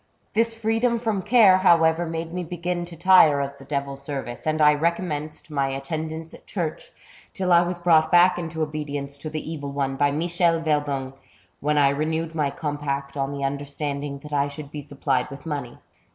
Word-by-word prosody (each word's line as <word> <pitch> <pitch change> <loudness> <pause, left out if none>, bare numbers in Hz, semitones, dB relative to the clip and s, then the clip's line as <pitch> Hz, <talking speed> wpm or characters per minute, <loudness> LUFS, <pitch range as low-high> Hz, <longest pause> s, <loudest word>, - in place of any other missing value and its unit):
" - - -42
This 230 +1 +2
freedom 225 +2 +1
from 220 -4 -1
care, 210 -3 +6
however, 165 -2 +4
made 165 0 -4
me 180 0 -3
begin 175 +1 -3
to 170 -1 -10
tire 170 -4 +6
of 140 0 -4
the 135 - -12
devil's 140 -1 -3
service, 140 -2 -6
and 155 0 +1
I 150 -1 +6
recommenced 155 -1 -2
my 140 -2 0
attendance 160 +4 -5
at - - -15
church, 170 -6 -4 0.4
till 185 -2 +1
I 170 - +7
was 175 0 -2
brought 160 -2 +3
back 175 +1 +5
into 160 -2 -3
obedience 145 -2 -4
to 155 - -6
the 155 0 -5
evil 145 -3 -5
one 135 -1 -2
by 145 +1 +3
Michel 170 +2 +1
Verdung, 145 -4 -1 0.5
when 150 +1 0
I 140 -1 +5
renewed 160 +3 -1
my 150 -3 0
compact 145 -3 -4
on 135 0 -1
the 140 -1 -4
understanding 140 0 -3
that 150 0 -9
I 140 0 +2
should 145 0 -9
be 150 - -6
supplied 140 -1 -1
with 140 +2 -10
money. 145 -6 -4
155 Hz, 190 wpm, -24 LUFS, 140-170 Hz, 0.5 s, I